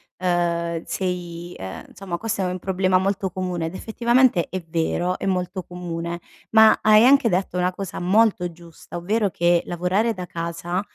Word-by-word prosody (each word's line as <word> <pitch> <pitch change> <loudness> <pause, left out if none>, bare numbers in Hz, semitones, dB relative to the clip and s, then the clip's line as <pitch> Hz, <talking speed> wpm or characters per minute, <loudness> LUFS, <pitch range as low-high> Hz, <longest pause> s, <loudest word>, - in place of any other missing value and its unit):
ehm, 170 -2 -1
sei, 175 -2 -4
ehm 95 0 -7
insomma 180 -2 -6
questo 220 -1 -2
è 185 - 0
un 180 0 -3
problema 185 0 +1
molto 190 0 -1
comune 180 -3 -3
ed 165 - -5
effettivamente 235 -2 +2
è 185 - -4
vero, 175 +2 0
è - - -4
molto 185 0 -2
comune, 170 -1 -5 0.3
ma 220 0 +7
hai 215 +1 +6
anche 275 -1 +6
detto 180 -2 0
una 180 0 +1
cosa 195 -1 -6
molto 190 -1 +2
giusta, 170 0 -13
ovvero 200 +4 0
che 175 0 +2
lavorare 185 +6 0
da 185 -3 -6
casa, 170 +2 -3
180 Hz, 165 wpm, -23 LUFS, 175-195 Hz, 0.3 s, ma